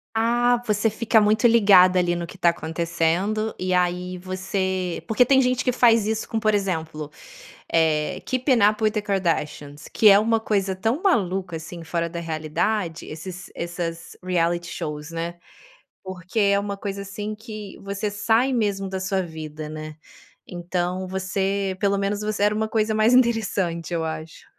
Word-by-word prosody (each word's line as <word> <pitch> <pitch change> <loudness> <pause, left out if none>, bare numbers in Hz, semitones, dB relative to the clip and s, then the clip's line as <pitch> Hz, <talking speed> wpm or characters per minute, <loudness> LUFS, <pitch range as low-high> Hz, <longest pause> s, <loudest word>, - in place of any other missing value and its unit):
Ah, 240 +2 +2
você 210 +1 +1
fica 220 0 +3
muito 215 +2 +3
ligada, 195 -5 +6
ali, 175 -1 +2
no 170 0 -4
que 180 - -12
está 175 -2 +4
acontecendo 170 +6 -1
e 185 0 -2
aí 180 0 0
você 185 -1 -3
Porque 220 +3 +4
tem 265 +2 +4
gente 255 -1 +1
que 250 - +2
faz 230 -3 +4
isso 220 0 -2
com, 225 - -1
por 215 -1 +2
exemplo, 160 -6 -2 0.6
eh, 160 +2 +1
Keep 255 +2 -2 0.2
Up 215 +1 -5
with 215 -1 +3
the 215 0 -2
Kardashians, 165 -7 -2
que 220 - +4
é 200 - +8
uma 225 +2 +2
coisa 200 -3 0
tão 225 - -1
maluca, 190 - +1
assim, 165 +1 -9
fora 170 +1 -2
da 170 0 -5
realidade 165 +3 -2
esses 175 +3 -8
essas 170 -1 -5
reality 175 -1 0
shows, 150 -2 -5
né. 165 +1 -4 0.7
Porque 185 +2 -4
é 200 -1 +4
uma 200 0 -3
coisa, 200 0 -5
assim, 210 +2 -6
que 215 -2 -9
você 200 +1 -3
sai 225 +5 +2
mesmo 200 -5 0
da 190 0 -4
sua 190 0 -1
vida, 155 -2 -7
né. 155 0 -7 0.5
Então, 180 +1 -3
você 190 +1 -2
pelo 200 +1 +1
menos 200 +1 -1
você 210 -1 -2
era 210 +1 +3
uma 220 +1 0
coisa 220 0 0
mais 215 +3 +3
interessante 195 -9 +1
eu 165 -1 -1
acho. 160 0 -7
190 Hz, 165 wpm, -23 LUFS, 170-215 Hz, 0.7 s, é